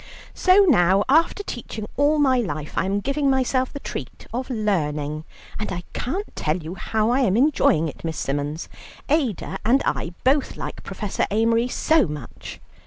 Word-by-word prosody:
"So 375 +2 +5
now, 195 - +4
after 325 +8 +3
teaching 225 - -6
all 290 +2 +3
my 265 -4 +3
life, 155 -9 -4
I - - +1
am 200 +1 0
giving 275 +3 0
myself 260 -1 +1
the 285 - -6
treat - - -7
of 255 +3 -3
learning, 155 - -1 0.3
and 210 - -3
I 175 -1 -4
can't 375 - -4
tell 155 +2 0
you 165 0 -7
how 215 +4 0
I 255 - +3
am 225 -6 +2
enjoying 245 - +3
it, 150 - -9
Miss 165 -1 -3
Symons. 145 +3 -3 0.4
Ada 275 - 0
and 250 +5 +3
I 170 +1 -2
both 270 +2 +2
like - - -6
Professor 210 -3 -3
Amery 230 +3 +2
so 315 - +2
much." 150 -5 -8
225 Hz, 170 wpm, -23 LUFS, 170-270 Hz, 0.4 s, So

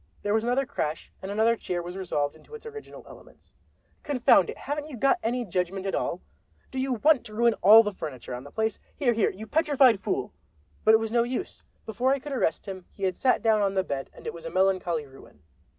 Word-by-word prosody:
There 205 - 0
was 220 0 +2
another 250 +3 +1
crash, 155 -9 -4
and 190 - -6
another 220 +3 +2
chair 180 -5 -4
was 175 +1 -7
resolved 150 -7 -2
into 305 - -13
its 455 - -12
original 440 -1 -10
elements. - - -16 0.5
"Confound 250 - +3
it, - - -6
haven't 290 +2 -4
you 265 - -8
got 275 +9 +3
any 240 +2 -1
judgment 185 0 -2
at 195 - -2
all? 175 - -2 0.5
Do 265 - -4
you 265 0 0
want 285 +3 +3
to 215 - -11
ruin 235 +1 +3
all 220 +4 +9
the 210 -1 -3
furniture 130 -8 -7
on 125 +1 -6
the 140 - -11
place? 220 +5 -2 0.2
Here, 250 -5 +2
here, 220 -2 +2
you 205 +4 -8
petrified 275 - +3
fool—" - - -3 0.5
But 220 - +6
it - - +4
was 225 -1 -3
no 235 0 +3
use. 250 +9 -4 0.2
Before 240 +5 0
I 275 - +2
could 285 +2 -8
arrest 255 -11 0
him 185 -2 -7
he 195 - -11
had 185 -1 +1
sat 255 - +1
down 220 -2 +3
on 195 -1 0
the 190 - +2
bed, 140 -6 -4
and - - -16
it - - -4
was 170 - -10
a 165 - -5
melancholy 185 -4 +1
ruin. 135 - -17
220 Hz, 230 wpm, -27 LUFS, 185-255 Hz, 0.5 s, all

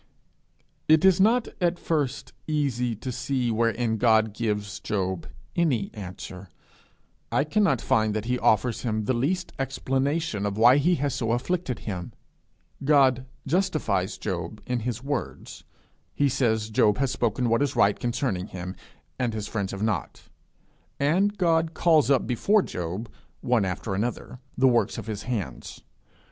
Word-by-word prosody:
It 155 +3 +5
is 190 -1 +5
not 230 +4 +4
at 175 0 +2
first 150 -7 -2
easy 130 -6 0
to 125 +5 -5
see 130 -1 -1
wherein 115 0 +1
God 110 -2 +3
gives 105 -2 -2
Job 95 -4 -2 0.3
any 135 - +1
answer; 95 -1 -8 0.8
I 140 - +2
cannot 155 - +2
find 110 -1 +1
that 110 0 -2
he 125 +1 0
offers 110 +2 +2
him 110 -3 -1
the 130 - +1
least 160 +10 -1
explanation 135 -2 -1
of 100 0 -3
why 120 +4 +7
he 170 +5 +3
has 145 -3 -1
so 115 -1 -1
afflicted 130 +2 -1
him. 90 -5 -5 0.7
He 150 +2 +4 0.5
justifies 155 - 0
him 90 0 -4
in 125 -1 -1
his 120 +1 -4
words; 140 -2 -5 0.5
he 145 -1 +2
says 110 -5 0
Job 105 -1 +3
has 135 -1 0
spoken 120 +1 0
what 115 +3 +2
is 145 - 0
right 100 0 +3
concerning 115 -6 -1
him, 90 -1 -6 0.4
and 120 -3 -1
his 105 -1 -4
friends 100 -4 -2
have 100 +1 -4
not; 110 -5 -2 0.8
and 175 +9 +3
he 165 -2 +3
calls 160 -5 +4
up 135 -3 +3
before 195 - +2
him, 90 +5 -4 0.4
one 120 -5 +2
after 95 +2 -3
another, 120 +4 -3 0.2
the 130 +1 +5
works 120 -2 +2
of - - -6
his 105 -2 -4
hands. 100 - -5
120 Hz, 150 wpm, -26 LUFS, 105-145 Hz, 0.8 s, why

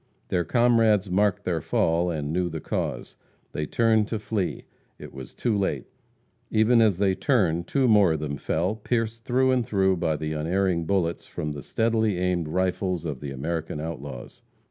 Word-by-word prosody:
Their 90 - +1
comrades 115 -4 +3
marked 100 +1 +2
their 85 -3 -1
fall, 85 +4 +1
and 75 -2 -3
knew 90 0 0
the 80 -1 -5
cause. - - -4 0.3
They 75 0 -3
turned 110 -2 +2
to 110 - -2
flee. 105 -3 -3 0.3
It - - -11
was 65 -2 -9
too 115 -3 0
late. 100 -1 -1 0.6
Even 115 +2 +4
as 105 -5 +3
they 95 -1 +2
turned 95 - +1
two 135 -2 +2
more 105 -7 +5
of 80 - -2
them 70 -2 -3
fell, 90 +9 -1
pierced 115 0 -2
through 130 +1 +2
and 125 -2 +2
through 95 -3 +1
by 80 -2 0
the 75 +1 -3
unerring 85 +2 0
bullets 85 -2 -1
from 75 - -4
the 75 -1 -6
steadily 110 - 0
aimed 90 -2 0
rifles 90 0 -1
of 75 -5 -4
the 70 - -6
American 75 +3 -4
outlaws. 70 -6 -7
90 Hz, 175 wpm, -25 LUFS, 80-110 Hz, 0.6 s, more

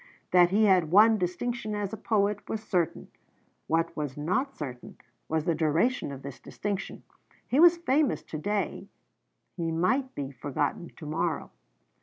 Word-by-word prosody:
That 175 -1 +6
he 210 +4 +3
had 185 -5 +4
won 215 +4 +6
distinction 215 +5 -2
as 205 0 -3
a - - -1
poet 205 -2 0
was 220 0 -3
certain; 180 -6 -1 0.6
what 165 +1 0
was 145 -3 -4
not 185 - -1
certain 125 -5 -7 0.3
was 160 -1 0
the 170 - +2
duration 160 - +1
of 135 -1 -8
this 140 -2 -8
distinction. 200 -2 -5 0.4
He 265 - +1
was 345 +1 +7
famous 300 -4 +1
to 155 - -6
day; 205 +6 -2 0.7
he 165 -2 -2
might 255 +11 0
be 140 -1 -4
forgotten 145 +5 -3
to 160 - -9
morrow. 160 +2 -2
180 Hz, 155 wpm, -28 LUFS, 155-220 Hz, 0.7 s, was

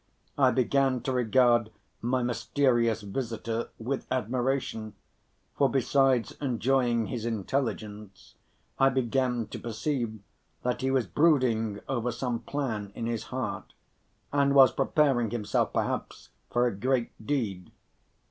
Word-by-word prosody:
I 135 -2 +5
began 130 0 +2
to 130 - -2
regard 120 -2 +3 0.3
my 125 +2 0
mysterious 120 -1 +1
visitor 115 +1 -3
with 130 +4 -3
admiration, 125 -3 -1 0.6
for 140 - +3
besides 135 -1 +2
enjoying 125 -2 +1
his 120 -3 -4
intelligence, 110 -3 -3 0.5
I 135 - +6
began 125 -2 0
to - - -6
perceive 115 -1 -3 0.4
that 125 0 -1
he 130 - 0
was 130 -3 +2
brooding 115 - +2
over 125 -2 -1
some 120 -1 -2
plan 115 -9 -3
in 115 - -4
his 115 -1 -2
heart, 105 -8 -5 0.6
and 140 -1 +3
was 135 -2 +8
preparing 135 -4 +2
himself 105 -2 0
perhaps - - -3 0.2
for 120 +1 +2
a 120 - 0
great 125 +3 0
deed. 105 -9 -2
120 Hz, 120 wpm, -28 LUFS, 115-135 Hz, 0.6 s, was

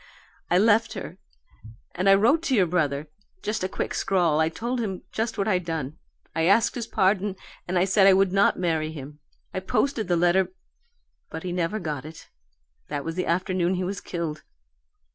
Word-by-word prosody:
I 175 - +4
left 220 +3 +3
her, - - -7 0.7
and 185 +3 +1
I 195 - +8
wrote 240 +11 +3
to 270 -5 +2
your 195 -5 +4
brother 155 -4 0 0.4
just 215 -2 -2
a 185 - -1
quick - - -3
scrawl. 175 -5 +1
I 160 0 +3
told 240 +9 -3
him 195 -5 -3
just 225 0 -2
what 200 - 0
I'd 185 -4 +1
done; 160 -4 -4 0.4
I 165 0 +1
asked 200 +6 +4
his 235 -2 -4
pardon, 195 +1 +1 0.3
and 180 +1 0
I 180 - +4
said 195 0 +4
I 195 - +8
would 195 0 +3
not 195 0 +3
marry 160 -3 0
him. 150 -1 -9 0.3
I - - -1
posted 220 +4 0
the 175 -1 +2
letter, 175 +2 +3 0.8
but 160 - -7
he 180 - -3
never 180 +4 -1
got 150 -7 -4
it. 155 +1 -11 0.6
That 145 -1 -4
was 165 - -3
the 180 +2 -2
afternoon 185 +1 +1
he 185 - -2
was 190 +1 -4
killed. 165 -3 -4
185 Hz, 190 wpm, -25 LUFS, 165-200 Hz, 0.8 s, I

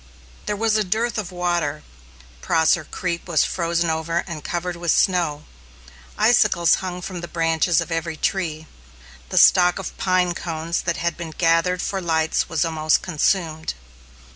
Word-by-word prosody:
There 210 - 0
was 220 +1 +1
a 215 - +2
dearth 220 +4 -1
of 190 -3 -5
water. 175 -4 -1 0.6
Prosser 160 0 +2
Creek 170 +1 -4
was 165 -4 +3
frozen 170 -1 0
over 165 +2 -1
and 160 -5 -7
covered 175 0 -3
with 170 0 -4
snow. 165 -6 +2 0.7
Icicles 210 -6 +4
hung 180 -1 -5
from 180 -2 -6
the 175 - -6
branches 165 0 +1
of 170 0 -6
every 165 -1 -3
tree. 160 -3 -2 0.6
The - - -3
stock 180 -1 +6
of 195 - -6
pine 185 -1 +2
cones 165 0 -3
that 170 -1 -2
had 170 0 -2
been 170 -2 -6
gathered 165 +2 +2
for 195 -1 -2
lights 160 -2 0
was 165 0 0
almost 155 -1 +1
consumed. 160 -2 -1
170 Hz, 155 wpm, -22 LUFS, 160-180 Hz, 0.7 s, stock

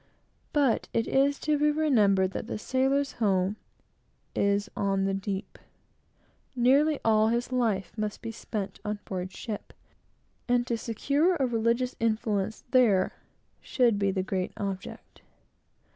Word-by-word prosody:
But 280 -6 +2
it 230 - +1
is 275 +1 +2
to 300 -1 +1
be 300 0 +4
remembered 215 -12 +3
that 215 - -5
the - - -3
sailor's 270 +4 +1
home 195 -2 0 0.8
is 200 +1 +1
on 195 -1 0
the 195 - 0
deep. 195 0 -4 1.0
Nearly 275 +5 +3
all 215 -1 +4
his 235 +3 -1
life 225 -7 0
must 215 0 -4
be 230 - -4
spent 210 -3 -5
on 210 -1 -2
board 185 -1 -4
ship; 210 0 -7 0.7
and 245 -1 +2
to 235 - -1
secure 280 - +1
a 275 -5 +1
religious 235 +1 0
influence 215 -2 -1
there, 215 -8 +4 0.5
should 235 -5 +2
be 200 -1 +2
the 190 -1 -1
great 185 -1 -2
object. 195 -2 -6
225 Hz, 135 wpm, -28 LUFS, 200-255 Hz, 1.0 s, be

